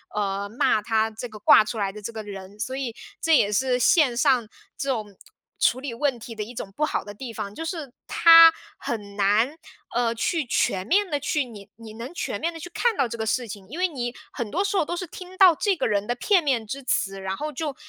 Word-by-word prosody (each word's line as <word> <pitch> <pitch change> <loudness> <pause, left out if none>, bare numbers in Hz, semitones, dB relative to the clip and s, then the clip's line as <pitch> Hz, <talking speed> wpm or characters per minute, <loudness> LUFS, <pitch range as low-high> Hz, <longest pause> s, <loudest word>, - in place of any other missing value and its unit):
呃， 200 -1 -2
骂 215 -1 +2
他 220 0 +1
这 230 +3 -7
个 215 - -10
挂 215 - +6
出 220 +2 -5
来 200 -2 -1
的 210 +2 -10
这 220 +3 -5
个 220 -1 -6
人。 200 0 -10
所 260 +3 -3
以 260 -4 -4 0.3
这 325 -2 +4
也 205 - +2
是 255 +3 +2
线 255 -1 +4
上 245 -3 +3 0.3
这 275 - -4
种 215 -6 -3 0.4
处 250 - +3
理 265 -3 -5
问 275 0 0
题 230 0 -9
的 215 - -6
一 240 +4 -10
种 195 -3 -6
不 305 - -1
好 - - -2
的 205 - -9
地 235 +3 -7
方， 205 -2 -6
就 325 - -6
是 320 -6 -5
他 330 0 +8 0.3
很 205 -3 -5
难， 210 +9 +2 0.4
呃， 240 -1 +1
去 320 +7 0
全 190 -5 0
面 405 +5 +3
的 290 -1 -1
去 285 0 0
你 205 -5 -12
你 225 -1 -11
能 235 +6 -7
全 - - -3
面 335 +2 0
地 330 - -9
去 355 - -8
看 465 +1 0
到 260 - +2
这 235 - -6
个 220 - -3
事 240 +1 0
情， 200 -2 -9
因 305 - -7
为 370 - +3
你 245 -7 -4 0.2
很 230 -3 -4
多 375 - 0
时 405 0 -1
候 375 - +3
都 345 - -3
是 360 - -3
听 370 +2 -11
到 370 -4 +7
这 400 +4 +1
个 - - 0
人 205 -1 0
的 245 - +1
片 365 - +2
面 255 -6 0
之 275 +6 -5
词， 195 -5 -1
然 190 0 -3
后 300 +1 -4
就， 295 0 -4
240 Hz, 265 characters per minute, -24 LUFS, 210-300 Hz, 0.4 s, 他